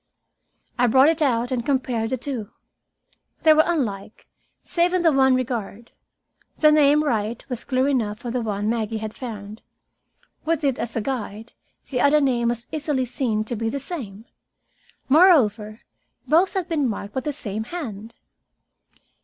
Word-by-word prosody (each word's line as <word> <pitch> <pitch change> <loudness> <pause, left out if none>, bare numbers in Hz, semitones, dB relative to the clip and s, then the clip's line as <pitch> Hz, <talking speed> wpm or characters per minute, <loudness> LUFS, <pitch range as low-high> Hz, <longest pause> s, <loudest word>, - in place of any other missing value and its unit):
I 245 - +4
brought 265 +5 +5
it 325 0 0
out 245 -4 +1
and 245 -2 -1
compared 250 -4 -1
the 260 - -1
two. 245 -5 -5 0.9
They 315 -1 +7
were 310 - +6
unlike, 225 - -3 0.4
save 350 +1 +1
in 360 - +1
the 330 - +5
one 265 -2 +4
regard. 235 -3 -4 0.7
The 305 -1 +5
name 300 0 +4
"Wright" 225 -4 -2
was 250 -2 -5
clear 260 0 0
enough 230 -5 -1
on 240 - -3
the 250 - -1
one 210 -2 -2
Maggie 225 -1 -1
had 215 0 -5
found. 215 -4 -8 0.8
With 325 -1 -1
it 275 -3 0
as 235 -1 -4
a 225 - 0
guide, 225 -2 -5 0.4
the 250 -2 0
other 295 +2 +5
name 250 -4 +1
was 235 0 -2
easily 295 -4 -1
seen 230 -3 -1
to 230 +2 -4
be 225 +1 -2
the 280 - -3
same. 235 - -5 0.8
Moreover, 235 - +4 0.5
both 335 +8 +3
had 375 -3 -1
been 295 -6 0
marked 205 -1 -6
by - - -1
the 295 +3 -3
same 220 -6 -5
hand. 230 - -7
250 Hz, 160 wpm, -23 LUFS, 220-285 Hz, 0.9 s, They